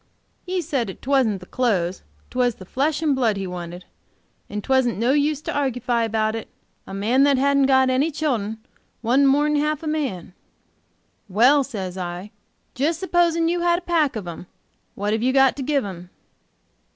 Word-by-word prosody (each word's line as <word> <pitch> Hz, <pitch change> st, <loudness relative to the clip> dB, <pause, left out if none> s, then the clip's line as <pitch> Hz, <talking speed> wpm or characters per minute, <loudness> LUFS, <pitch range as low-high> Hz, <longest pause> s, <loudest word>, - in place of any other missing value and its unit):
He 365 Hz, -1 st, -1 dB
said 245 Hz, -, -2 dB
'twasn't 255 Hz, -8 st, +1 dB
the -, -, -10 dB
clothes, 185 Hz, -7 st, -1 dB, 0.3 s
'twas 250 Hz, -2 st, +1 dB
the 185 Hz, -, -12 dB
flesh 290 Hz, -, -1 dB
and 295 Hz, -3 st, +2 dB
blood 230 Hz, -6 st, +1 dB
he 195 Hz, -, -3 dB
wanted, 180 Hz, 0 st, -7 dB, 0.6 s
and 210 Hz, 0 st, -5 dB
'twasn't 260 Hz, -4 st, +2 dB
no 235 Hz, +4 st, +2 dB
use 295 Hz, +1 st, +1 dB
to -, -, -4 dB
argufy 250 Hz, -4 st, 0 dB
about 220 Hz, -1 st, 0 dB
it; 225 Hz, -, -6 dB, 0.4 s
a -, -, -9 dB
man 225 Hz, +7 st, +2 dB
that 280 Hz, -2 st, +3 dB
hadn't 280 Hz, 0 st, +3 dB
got 265 Hz, -1 st, +4 dB
any 270 Hz, +5 st, +2 dB
children 245 Hz, -9 st, -2 dB, 0.5 s
wasn't 260 Hz, +5 st, +4 dB
mor'n 295 Hz, +2 st, +3 dB
half 300 Hz, +1 st, -1 dB
a -, -, -4 dB
man. 265 Hz, -, -3 dB, 1.0 s
'Well,' 250 Hz, +9 st, +5 dB
says 190 Hz, -8 st, -6 dB
I, 180 Hz, +3 st, -5 dB, 0.4 s
supposing 335 Hz, +3 st, +1 dB
you 345 Hz, +1 st, 0 dB
had 345 Hz, 0 st, +2 dB
a -, -, -5 dB
pack 320 Hz, -7 st, +1 dB
of, 205 Hz, -5 st, -5 dB
'em, 170 Hz, +1 st, -8 dB, 0.5 s
what 205 Hz, +1 st, -1 dB
have 220 Hz, -, 0 dB
you 255 Hz, +2 st, +2 dB
got 270 Hz, -1 st, +4 dB
to -, -, -4 dB
give 275 Hz, -1 st, 0 dB
'em?' 180 Hz, -2 st, -8 dB
260 Hz, 175 wpm, -22 LUFS, 210-290 Hz, 1.0 s, Well